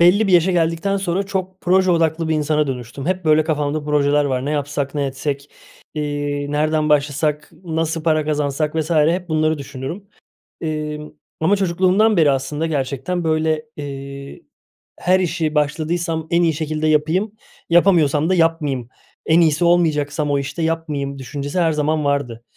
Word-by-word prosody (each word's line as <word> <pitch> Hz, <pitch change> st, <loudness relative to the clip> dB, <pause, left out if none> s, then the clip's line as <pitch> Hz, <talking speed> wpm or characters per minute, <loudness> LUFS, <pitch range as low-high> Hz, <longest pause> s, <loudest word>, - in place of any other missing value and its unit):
belli 195 Hz, +5 st, +5 dB
bir 190 Hz, -, +1 dB
yaşa 175 Hz, +1 st, +5 dB
geldikten 170 Hz, +3 st, +1 dB
sonra 190 Hz, 0 st, -1 dB
çok 190 Hz, -1 st, -4 dB
proje 185 Hz, +1 st, +3 dB
odaklı 165 Hz, -1 st, +1 dB
bir 160 Hz, -, +1 dB
insana 150 Hz, 0 st, +1 dB
dönüştüm. 130 Hz, +2 st, -6 dB
Hep, 185 Hz, -1 st, -1 dB
böyle, 155 Hz, 0 st, +4 dB
kafamda 150 Hz, -1 st, -1 dB
projeler 145 Hz, 0 st, +2 dB
var. 130 Hz, -2 st, -1 dB
"Ne 145 Hz, -, -2 dB
yapsak, 145 Hz, -1 st, -2 dB
ne 145 Hz, -2 st, 0 dB
etsek, 140 Hz, +1 st, -4 dB, 0.4 s
iii, 145 Hz, -1 st, -3 dB
nereden 155 Hz, +1 st, +1 dB
başlasak, 150 Hz, +1 st, 0 dB
nasıl 165 Hz, -1 st, -2 dB
para 155 Hz, -1 st, +2 dB
kazansak?" 150 Hz, 0 st, -1 dB
vs. 160 Hz, +1 st, -1 dB
hep 170 Hz, +3 st, +2 dB
bunları 155 Hz, -1 st, +1 dB
düşünürüm. 140 Hz, +9 st, -7 dB, 0.5 s
Emm, 150 Hz, -1 st, -4 dB, 0.3 s
ama 185 Hz, +6 st, +3 dB
çocukluğumdan 190 Hz, +3 st, +2 dB
beri 150 Hz, -4 st, +5 dB
aslında 135 Hz, +4 st, -2 dB
gerçekten, 150 Hz, +4 st, -2 dB
böyle, 155 Hz, -1 st, 0 dB
eee, 140 Hz, -1 st, -7 dB, 0.6 s
her 185 Hz, +1 st, +3 dB
işi 160 Hz, -3 st, -1 dB
başladıysam 160 Hz, +2 st, -1 dB
en 170 Hz, +1 st, +3 dB
iyi 165 Hz, -, +2 dB
şekilde 155 Hz, 0 st, -2 dB
yapayım, 160 Hz, +7 st, +1 dB, 0.4 s
yapamıyorsam 165 Hz, -3 st, +4 dB
da 185 Hz, -, +3 dB
yapmayayım. 155 Hz, -7 st, 0 dB, 0.4 s
En 165 Hz, +2 st, +4 dB
iyisi 160 Hz, +1 st, +2 dB
olmayacaksam 150 Hz, -4 st, +1 dB
o 140 Hz, -, +2 dB
işte, 140 Hz, +4 st, -5 dB
yapmayayım 150 Hz, -4 st, -2 dB
düşüncesi 145 Hz, +5 st, -4 dB
her 165 Hz, -2 st, +3 dB
zaman 150 Hz, 0 st, 0 dB
vardı. 130 Hz, -5 st, -1 dB
155 Hz, 155 wpm, -20 LUFS, 145-170 Hz, 0.6 s, belli